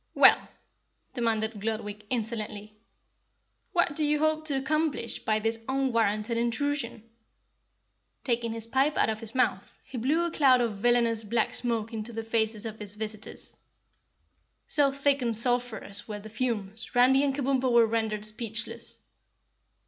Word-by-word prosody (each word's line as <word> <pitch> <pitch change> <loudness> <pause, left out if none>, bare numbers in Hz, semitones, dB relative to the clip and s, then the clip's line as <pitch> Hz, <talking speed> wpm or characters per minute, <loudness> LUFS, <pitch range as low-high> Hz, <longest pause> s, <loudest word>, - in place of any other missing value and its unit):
"Well," - - +6 0.6
demanded 220 -3 -1
Gludwig, 210 -1 -4
insolently, 215 -3 -3 1.0
"what 345 -4 +2
do 310 - +1
you 300 0 +2
hope 310 +1 +1
to 285 -3 +6
accomplish 295 -2 -1
by 215 -1 0
this 225 +1 -1
unwarranted 230 -4 +1
intrusion?" 240 0 -1 1.2
Taking 235 -2 0
his 225 0 -3
pipe 270 +5 +1
out - - +3
of 215 - -4
his 225 +1 -9
mouth, 245 -6 0
he 260 -2 -7
blew 305 +8 +1
a 340 - -2
cloud 265 -5 +5
of 230 -4 -1
villainous 235 0 +2
black 220 +1 0
smoke 230 -2 -2
into 225 +1 -5
the 225 0 -4
faces 220 -1 -1
of 220 -1 -6
his 205 -1 -7
visitors. 215 0 -7 1.1
So 285 -2 +3
thick 275 0 +1
and 235 -2 0
sulphurous 235 -3 -2
were 210 -2 -5
the 215 +1 -10
fumes, 220 -1 -3
Randy 260 +3 +5
and 275 -1 +1
Kabumpo 265 -2 +1
were 235 -1 +6
rendered 220 -2 -1
speechless. 225 +1 -3
230 Hz, 145 wpm, -28 LUFS, 220-265 Hz, 1.2 s, Well